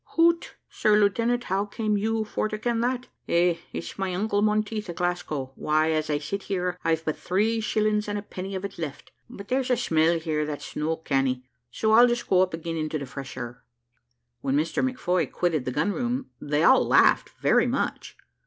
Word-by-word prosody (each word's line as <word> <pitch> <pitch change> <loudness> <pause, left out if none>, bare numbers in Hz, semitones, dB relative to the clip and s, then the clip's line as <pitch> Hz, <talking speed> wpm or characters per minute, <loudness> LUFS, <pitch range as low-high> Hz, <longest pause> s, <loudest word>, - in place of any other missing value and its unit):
"Hoot; 335 0 +3
sir 210 0 +2
lieutenant, 230 +4 +2
how 195 -1 0
came 210 0 -1
you 220 +2 0
for 215 0 -2
to 215 - -3
ken 230 +1 -1
that? 250 +1 -1 0.2
Eh; 170 0 +3
it's 170 - -6
my 190 -2 -1
uncle 205 +1 0
Monteith 215 -1 0
at 170 - -5
Glasgow. 160 -7 -2
Why, 155 +3 +1
as 155 -1 -1
I 150 - +2
sit 195 +7 -4
here, 180 -2 -2
I've 160 0 0
but 155 - 0
three 215 +5 0
shillings 215 -1 +1
and 205 0 -2
a 205 - -5
penny 190 -1 -6
of 190 +1 -3
it 195 - -8
left. 145 -3 -6 0.2
But 200 -4 -10
there's 260 0 0
a 250 - +3
smell 165 -6 +2
here 155 -2 -1
that's 150 -1 -6
no 160 +2 0
canny; 135 -5 0 0.3
so 220 - 0
I'll 235 +3 +8
just 240 0 -1
go 185 -1 +4
up 185 -3 +1
again 165 0 -4
into 155 0 -2
the 140 - -5
fresh 135 0 -8
air." 120 0 -7 0.8
When 135 0 0
Mr 160 +2 0
McFoy 180 - 0
quitted 165 -7 0
the 130 - -1
gun 150 +10 0
room 250 +3 -2
they 150 +2 0
all 260 +9 +6
laughed - - +4
very - - +3
much. - - -2
185 Hz, 200 wpm, -26 LUFS, 155-215 Hz, 0.8 s, I'll